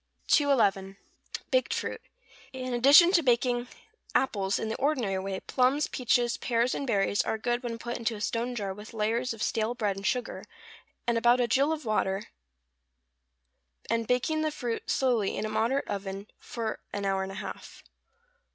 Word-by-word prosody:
211. 200 -10 +3 0.5
=Baked - - +2
Fruit.= - - -4 0.5
In 255 -1 -4
addition 285 +8 +7
to 360 -3 +4
baking 245 -2 +1 0.5
apples 200 -7 +1
in - - -3
the 220 - -2
ordinary 255 -9 0
way, 190 0 -4
plums, 265 +3 +2
peaches, 245 -1 +1
pears, 235 +1 0
and 275 - -3
berries, 205 -2 +2
are 220 - -2
good 240 +2 -1
when 235 -2 -4
put 240 +1 -5
into 230 -1 -2
a - - -8
stone 235 +4 -2
jar 200 -4 -3
with 210 +3 -11
layers 230 +4 0
of 225 -2 -4
stale 225 +2 0
bread 210 -5 -1
and 195 0 -3
sugar, 250 +3 -2 0.6
and 235 -1 +1
about 240 +1 +4
a 245 - +3
gill 275 +6 +2
of 310 -3 -3
water, 200 -2 0 1.7
and 230 -1 0
baking 310 +6 +1
the 310 - +1
fruit 245 -6 -4
slowly 240 -7 +1
in - - -2
a - - -3
moderate 230 +6 0
oven 195 0 -5
for 225 -2 -4
an 205 -1 -3
hour 195 -1 +1
and 190 0 -4
a - - -8
half. - - -8
235 Hz, 170 wpm, -28 LUFS, 210-255 Hz, 1.7 s, addition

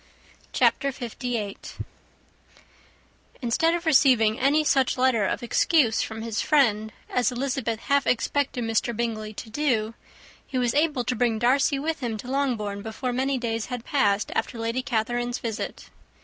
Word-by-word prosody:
_]] - - -27
CHAPTER 275 - +2
LVIII. 235 -4 -4 1.8
Instead 310 +7 +2
of 345 0 -4
receiving 255 -8 +4
any 285 +4 +3
such 270 -4 +2
letter 250 -5 +3
of - - -2
excuse 240 -1 +3
from 220 0 -5
his 225 -2 -2
friend, 220 -8 +2 0.2
as 250 +1 +1
Elizabeth 245 -3 -2
half 280 0 +1
expected 260 +1 0
Mr. 225 0 0
Bingley 220 -2 -2
to 220 - -8
do, 230 -5 0 0.5
he 265 - -3
was 245 -2 +1
able 295 -4 +1
to 250 +1 -1
bring 230 -1 +1
Darcy 265 +4 +2
with 315 +3 -2
him 235 -4 -3
to 245 +5 -7
Longbourn 225 -8 -1
before 225 +4 -4
many 265 +2 0
days 230 -2 -2
had 250 -2 -5
passed 210 -8 +1
after 240 - -2
Lady 230 +3 -1
Catherine's 240 -1 -1
visit. 225 -1 -5
245 Hz, 150 wpm, -25 LUFS, 225-275 Hz, 1.8 s, receiving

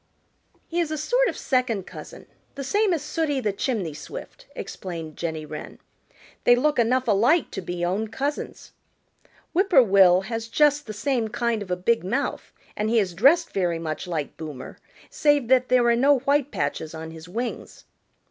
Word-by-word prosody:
"He 345 - -2
is 335 -3 0
a 310 - -3
sort - - +2
of - - -3
second 245 -7 0
cousin, - - -11 0.3
the 275 - -5
same 410 +8 +1
as 325 -5 0
Sooty 300 -2 -1
the 210 -5 -1
Chimney 200 - -2
Swift," - - -10
explained 165 -4 -7
Jenny 160 -2 -4
Wren. 150 0 -8 0.7
"They 245 - +6
look 295 +2 +1
enough 250 +2 +2
alike 235 - +3
to 195 - -5
be 175 0 -3
own 200 +5 -1
cousins. 275 +7 -4 0.8
Whip 380 +3 +2
poor 280 -9 +7
will 190 -3 +5
has 225 +3 -5
just 295 +3 +2
the 215 - -5
same 240 +1 -1
kind 235 0 -1
of 200 - -7
a 180 - +1
big 205 +5 +1
mouth 240 +10 -2 0.2
and 210 +1 -1
he 230 - +2
is 195 -5 +1
dressed 275 - +4
very 175 -3 0
much 160 +1 -5
like 160 -5 -4
Boomer, 150 -5 -8 0.3
save 290 -5 +2
that 255 -1 +4
there 250 -1 +4
are 235 0 +4
no 275 +4 +4
white 280 +1 +1
patches 155 - -3
on 160 0 -7
his 160 +1 -11
wings." 235 +6 -5
230 Hz, 180 wpm, -24 LUFS, 180-280 Hz, 0.8 s, poor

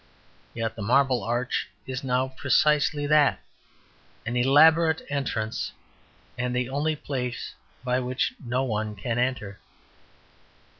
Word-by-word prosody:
Yet 115 -1 -3
the 110 - -7
Marble 125 +2 +2
Arch 120 -1 -1 0.2
is 130 +1 -5
now 130 0 0
precisely 145 +2 +2
that; 150 -1 +4 0.9
an 120 +2 -3
elaborate 160 +5 +5
entrance 115 -6 -2 0.7
and 125 0 -1
the 125 0 -1
only 150 +3 0
place 125 -4 -4 0.3
by 125 0 +1
which 125 0 -1
no 125 +2 -1
one 110 -3 -2
can 115 +4 -2
enter. 120 -6 -2
125 Hz, 115 wpm, -26 LUFS, 120-140 Hz, 0.9 s, elaborate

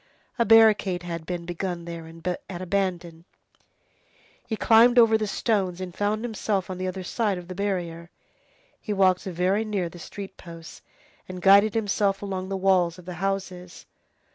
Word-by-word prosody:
A 235 - +3
barricade 215 -5 +5
had 170 -2 -6
been 175 -1 -4
begun 175 0 -4
there 170 -1 -7
and 165 +1 -10 0.2
abandoned. 180 -2 -3 1.2
He 220 - -2
climbed 235 +3 +5
over 230 -2 +6
the 215 -1 0
stones 195 -5 -1
and 185 -2 -6
found 210 +3 -1
himself 205 -4 -2
on 185 - -6
the 185 - -2
other 185 0 -5
side 205 +1 -1
of 175 -1 -9
the 185 - -6
barrier. 175 -4 -3 0.7
He 210 - -3
walked 190 -2 +2
very 185 +3 0
near 200 -5 -2
the 175 - -13
street 195 +3 -9
posts, 165 -2 -11 0.5
and 185 0 -6
guided 200 +4 +5
himself 205 -2 0
along 190 -1 -4
the 195 - -2
walls 185 -3 +2
of 180 - -14
the 180 - -6
houses. 190 -2 -4
190 Hz, 165 wpm, -25 LUFS, 175-205 Hz, 1.2 s, over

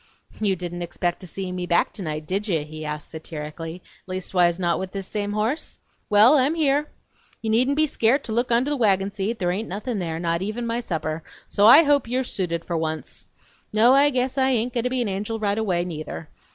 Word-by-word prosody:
"You 200 -3 +2
didn't 175 0 -6
expect 175 0 -2
to 185 - -8
see 190 +1 -5
me 180 -1 -4
back 170 -1 +2
tonight, 155 -6 -4
did 195 +6 -2
ye?" 165 -6 0
he 155 +1 -8
asked 150 -1 -5
satirically; 160 +2 -7 0.2
"leastwise 180 -2 +1
not 175 -2 0
with 190 0 -5
this 195 -1 -4
same 205 +1 -3
horse? 220 +9 -2 0.3
Well, 215 +8 +7
I'm 275 +5 +2
here! 295 -1 +1 0.5
You 220 - 0
needn't 255 +5 +3
be 310 +1 +4
scairt 270 -1 +2
to - - -5
look 240 +2 0
under 245 +5 +2
the 290 - 0
wagon 195 -4 +2
seat, 210 +3 -2
there 175 -3 0
hain't 210 +5 -3
nothin' 210 +4 -3
there, 165 -2 -3
not 170 0 -1
even 215 +5 -3
my 230 +1 -1
supper, 160 -7 -3 0.2
so 205 +1 +4
I 285 +8 +10
hope 285 -4 +2
you're 255 +2 0
suited 175 -8 -3
for 170 - -3
once! 160 -1 -4 0.4
No, 225 +4 +5
I 280 +2 +5
guess 260 0 -1
I 265 0 +3
hain't 240 +1 0
goin' 240 -1 -1
to - - +2
be 255 -1 0
an - - -3
angel 205 +3 -3
right 205 -2 0
away, 180 -5 0
neither. 155 -2 -6
200 Hz, 220 wpm, -24 LUFS, 175-240 Hz, 0.5 s, I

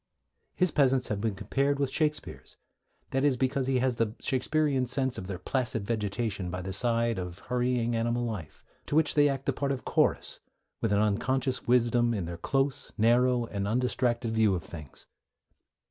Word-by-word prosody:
His 185 -3 +2
peasants 135 -3 +2
have 100 -2 -2
been 110 -2 -1
compared 140 +7 0
with 140 -2 -1
Shakespeare's; 150 0 -2 0.5
that 135 +1 0
is, 140 -3 +3
because 130 +1 0
he 135 -1 +2
has 125 -1 0
the 115 -1 0
Shakespearean 135 0 +1
sense 130 +1 -1
of 95 - -7
their 95 -2 -4
placid 115 +1 -2
vegetation 105 -3 -2
by 90 0 -4
the 95 +1 -4
side 115 0 +1
of 90 -1 -6
hurrying 120 +1 -1
animal 120 +1 0
life, 105 -10 -6 0.2
to - - -2
which 160 -1 +4
they 145 -1 +4
act 135 -1 -3
the 140 - +1
part 140 +1 -1
of 135 - -4
chorus, - - +1 0.4
with 115 - 0
an 100 - +3
unconscious 125 +5 0
wisdom 120 -1 +3
in 95 -5 -2
their 85 0 -6
close, 135 +6 -1
narrow, 120 +2 +3
and 100 -3 -3
undistracted 120 0 0
view 110 -3 +3
of 85 - -4
things. 75 -6 -11
120 Hz, 175 wpm, -29 LUFS, 105-135 Hz, 0.5 s, which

